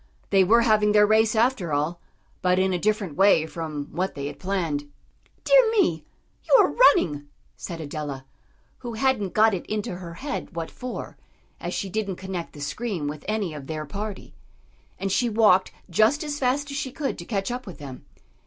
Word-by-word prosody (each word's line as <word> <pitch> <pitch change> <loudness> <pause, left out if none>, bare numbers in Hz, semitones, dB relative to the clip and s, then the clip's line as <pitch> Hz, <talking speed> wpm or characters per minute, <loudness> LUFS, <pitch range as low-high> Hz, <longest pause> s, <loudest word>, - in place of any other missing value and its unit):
They 195 -1 +6
were 230 +6 +5
having 215 -2 +3
their 210 0 +6
race, 220 +1 +3
after 220 -7 +1
all, 155 +4 -1 0.4
but 180 0 +2
in 190 0 +2
a 180 - 0
different 210 -5 -1
way 190 -4 +5
from 155 -3 -5
what 185 +3 -2
they 140 -1 -4
had 145 - -6
planned. 165 -7 -2 0.5
"Dear - - +6
me! 175 - +1 0.4
you - - +7
are - - +6
running!" 160 - +4 0.3
said 170 -2 -7
Adela, 145 -3 -5 0.5
who 240 -2 -6
hadn't 220 -6 0
got 220 0 +5
it 185 - -3
into 210 -4 -3
her 170 -2 -8
head 280 - -5
what 165 -1 -4
for, 250 0 -7 0.4
as - - -4
she 195 - -2
didn't 205 -2 -2
connect 185 -2 -6
the 145 - -10
scream 170 +2 -3
with 150 0 -6
any 210 -6 -1
of 140 -3 -8
their 155 -1 -4
party. 200 +6 -6 0.6
And 195 0 -2
she 240 +5 +2
walked 210 -4 +4 0.2
just 215 - +3
as 295 -1 -4
fast 280 +3 0
as 280 - -4
she 270 -2 -3
could 275 +1 -3
to - - -6
catch 195 +1 -2
up 250 -1 -5
with 185 - -8
them. 135 -4 -9
195 Hz, 190 wpm, -25 LUFS, 165-225 Hz, 0.6 s, you